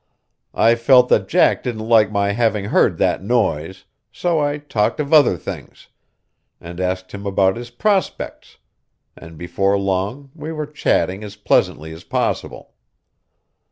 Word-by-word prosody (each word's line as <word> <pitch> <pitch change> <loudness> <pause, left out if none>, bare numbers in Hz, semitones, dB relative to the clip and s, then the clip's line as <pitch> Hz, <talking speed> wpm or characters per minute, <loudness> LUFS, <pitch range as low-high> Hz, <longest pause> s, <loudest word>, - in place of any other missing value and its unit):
I 115 - +4
felt 125 +2 +4
that - - +2
Jack - - +3
didn't 110 -3 -5
like 110 -3 +4
my 100 -1 0
having 110 -2 0
heard - - +2
that - - +1
noise, 95 -7 -1 0.3
so 170 -3 -1
I 145 0 0
talked 130 -7 -1
of 150 +1 -2
other 145 - +5
things, - - -9 0.7
and 85 +1 -10
asked 95 0 -3
him 100 0 -7
about 95 -1 +2
his 120 +1 -8
prospects, 195 - -2 0.6
and 85 -1 -13
before 95 +4 0
long 100 +8 -3
we 155 0 -7
were 155 -1 -4
chatting 105 -9 -1
as 105 -1 -9
pleasantly 80 -6 0
as 80 +2 -12
possible. - - -3
105 Hz, 145 wpm, -19 LUFS, 95-130 Hz, 0.7 s, other